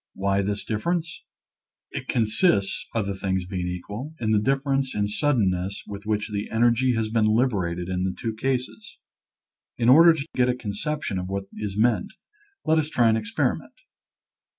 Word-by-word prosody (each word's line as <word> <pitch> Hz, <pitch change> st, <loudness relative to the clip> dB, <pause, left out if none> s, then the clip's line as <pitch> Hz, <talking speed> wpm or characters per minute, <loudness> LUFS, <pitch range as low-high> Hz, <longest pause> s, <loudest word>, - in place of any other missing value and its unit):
Why 100 Hz, 0 st, +1 dB
this 100 Hz, +1 st, -2 dB
difference? 165 Hz, +10 st, -2 dB, 0.7 s
It -, -, -6 dB
consists 110 Hz, -, +1 dB
(other 100 Hz, -3 st, 0 dB
things 95 Hz, -1 st, -2 dB
being 90 Hz, -1 st, -3 dB
equal) 105 Hz, -, -6 dB
in 110 Hz, -2 st, 0 dB
the 105 Hz, -, +4 dB
difference 135 Hz, +1 st, 0 dB
in 105 Hz, 0 st, +1 dB
suddenness 100 Hz, -6 st, 0 dB
with 100 Hz, +1 st, -8 dB
which 105 Hz, 0 st, -1 dB
the 100 Hz, 0 st, -3 dB
energy 120 Hz, +2 st, +3 dB
has 110 Hz, -1 st, -1 dB
been 110 Hz, -1 st, +2 dB
liberated 100 Hz, -7 st, +1 dB
in 90 Hz, -1 st, -2 dB
the 95 Hz, -1 st, -2 dB
two 115 Hz, -1 st, -2 dB
cases. 120 Hz, -2 st, -3 dB, 0.8 s
In 120 Hz, 0 st, +2 dB
order 165 Hz, +5 st, +8 dB
to 140 Hz, -3 st, -4 dB
get 125 Hz, 0 st, +2 dB
a 125 Hz, -, +1 dB
conception 120 Hz, 0 st, -3 dB
of 90 Hz, -, -4 dB
what 100 Hz, 0 st, -2 dB
is 105 Hz, -2 st, -5 dB
meant, 110 Hz, -3 st, +1 dB, 0.5 s
let 160 Hz, 0 st, +3 dB
us 155 Hz, -1 st, -1 dB
try 120 Hz, -6 st, +3 dB
an 110 Hz, -, +3 dB
experiment. 110 Hz, -1 st, -1 dB
110 Hz, 165 wpm, -25 LUFS, 100-125 Hz, 0.8 s, order